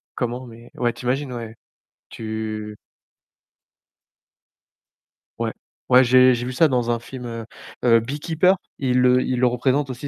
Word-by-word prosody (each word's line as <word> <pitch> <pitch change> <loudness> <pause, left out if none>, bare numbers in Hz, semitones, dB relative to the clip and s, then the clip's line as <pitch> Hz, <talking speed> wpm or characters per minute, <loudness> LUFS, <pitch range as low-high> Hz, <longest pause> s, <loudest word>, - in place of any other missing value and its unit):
comment, 125 +1 -3
mais 115 +1 -14
ouais, 120 -1 0
tu 120 +1 -11
imagines, 135 +1 -1
ouais. 115 -2 -7 0.5
Tu 110 -1 -5 2.6
Ouais. - - -1 0.4
Ouais, 130 +1 +7
j'ai 130 +1 +6
j'ai 120 0 -3
vu 130 - -4
ça 160 +5 +4
dans 125 -3 0
un 120 - 0
film, 125 +1 -9
heu, 115 -1 -6 0.4
heu: 115 -2 +5
Beekeeper. 160 +9 +1 0.2
Ils 125 -2 +1
le 125 0 +4
ils 130 - -1
le 125 - +4
représentent 130 +3 0
aussi, 130 +3 -6
125 Hz, 150 wpm, -22 LUFS, 115-130 Hz, 2.6 s, Ouais